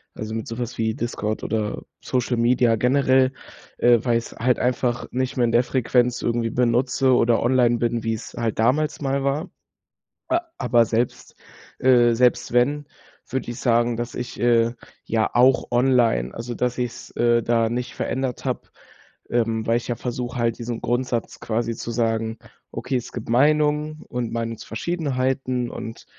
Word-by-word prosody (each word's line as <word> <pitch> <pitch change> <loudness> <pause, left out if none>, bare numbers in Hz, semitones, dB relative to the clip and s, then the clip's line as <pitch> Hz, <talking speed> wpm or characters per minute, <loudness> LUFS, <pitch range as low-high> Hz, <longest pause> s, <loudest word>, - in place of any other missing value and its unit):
also, 110 0 -5
mit 115 - -4
so 115 - -6
was 120 0 -4
wie 110 -1 0
Discord 110 -2 -3
oder 110 -2 -2 0.2
Social 125 -1 -1
Media 120 0 +3
generell, 130 +2 +3 0.4
äh, 120 -1 +5
weil 120 -2 +2
ich's 115 - -6
halt 125 +2 +1
einfach 125 -1 0
nicht 130 +1 -2
mehr 125 - +3
in 115 - 0
der 120 +1 +4
Frequenz 125 -1 +1
irgendwie 115 -1 0
benutze 125 +2 +2
oder 120 -1 +3
online 120 -1 +3
bin, 115 -1 -1
wie's 115 -1 -3
halt 115 -2 -2
damals 135 +7 +2
mal 135 -1 0
war. 140 +6 -1 0.8
A 335 +1 +2 0.2
aber 120 -1 +3
selbst, 115 +2 -2 0.4
äh 120 -2 +5
selbst 125 0 +2
wenn, 140 +4 +2 0.4
würde 130 -2 -3
ich 120 - -6
sagen, 120 -1 +2
dass 120 +1 -4
ich, 120 0 -6
äh, 115 -1 +3 0.3
ja 110 -1 0
auch 130 +2 +4
online 120 - +2
also, 120 +1 -5
dass 125 +1 -1
ich's, 125 -1 -4
äh, 120 0 +2
da 115 0 +2
nicht 120 +1 -4
verändert 130 0 -3
habe, - - -3 0.6
ähm, 115 -2 0
weil 115 +1 +3
ich 120 - -9
ja 120 - -1
versuche 125 +1 -4
halt 115 -1 0
diesen 120 -1 -4
Grundsatz 120 -1 -2
quasi 115 +1 -2
zu 115 - -6
sagen: 115 -1 -1 0.3
„Okay, 130 - -3
es 120 - -4
gibt - - -7
Meinungen 150 +3 +2
und 120 -1 -3
Meinungsverschiedenheiten 130 +2 -2
und 115 0 -7
120 Hz, 165 wpm, -23 LUFS, 115-130 Hz, 0.8 s, äh